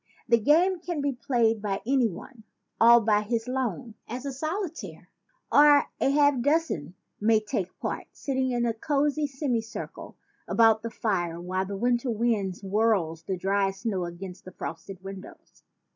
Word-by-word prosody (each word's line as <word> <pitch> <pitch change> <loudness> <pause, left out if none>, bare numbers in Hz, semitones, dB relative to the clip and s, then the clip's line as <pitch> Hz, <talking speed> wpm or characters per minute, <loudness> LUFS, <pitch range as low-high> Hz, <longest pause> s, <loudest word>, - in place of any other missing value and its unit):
The 235 -1 +4
game 335 - +3
can 345 -2 -4
be 285 0 0
played 235 -4 +1
by 200 -2 -2
any 260 -1 +3
one, 225 +5 -10 0.4
"all 235 +1 +7
by 210 -1 +3
his 225 +2 -2
lone," 250 -3 -3
as 250 +4 -6
a 275 - -3
soli 320 +6 -2
taire; 330 - -10 0.4
or 290 0 +7
a - - +2
half 285 -2 +3
dozen 285 - 0 0.2
may 220 +1 +4
take 210 -4 -4
part, - - -4
sitting 265 -2 -2
in 240 -1 0
a 230 - +1
cozy 290 +4 0
semi 265 -4 -1
circle 225 0 -8 0.3
about 225 -1 +4
the 230 - -4
wood - - -21
fire 175 -6 -1
while 185 +2 -2
the 200 0 -4
winter 240 +3 +1
wind 215 -5 0
swirls 195 -5 0
the 185 +3 -3
dry 195 +2 +1
snow 195 -2 -3
against 180 +2 -8
the 185 - -10
frosted 180 +4 -7
windows. 195 0 -11
230 Hz, 170 wpm, -27 LUFS, 195-270 Hz, 0.4 s, all